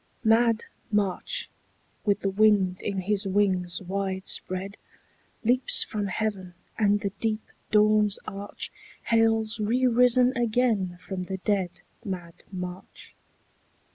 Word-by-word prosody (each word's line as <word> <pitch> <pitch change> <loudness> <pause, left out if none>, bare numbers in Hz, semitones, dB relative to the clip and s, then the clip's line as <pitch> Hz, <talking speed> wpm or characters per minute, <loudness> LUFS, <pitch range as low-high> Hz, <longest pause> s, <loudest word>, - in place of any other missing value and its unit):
MAD 225 0 +4 0.3
March, 210 - -1 0.6
with 205 -2 +2
the 195 - 0
wind 195 -3 +3
in 195 -2 -2
his 200 +1 +1
wings 190 -2 +1
wide 190 0 -3
spread, 190 +2 -2 0.7
Leaps 255 - +4
from 210 -2 -3
heaven, 190 -2 -3 0.2
and 205 -1 +2
the 200 -3 -2
deep 215 -1 -1 0.3
dawn's 210 -1 +4
arch 200 0 -6 0.4
Hails 225 -1 +2
re 235 +5 +1
risen 250 +1 +4
again 225 -6 +1
from 185 -1 -5
the 190 +1 -4
dead 190 -2 -1 0.2
Mad 180 -5 -5 0.2
March. 180 -1 -8
205 Hz, 115 wpm, -26 LUFS, 190-225 Hz, 0.7 s, MAD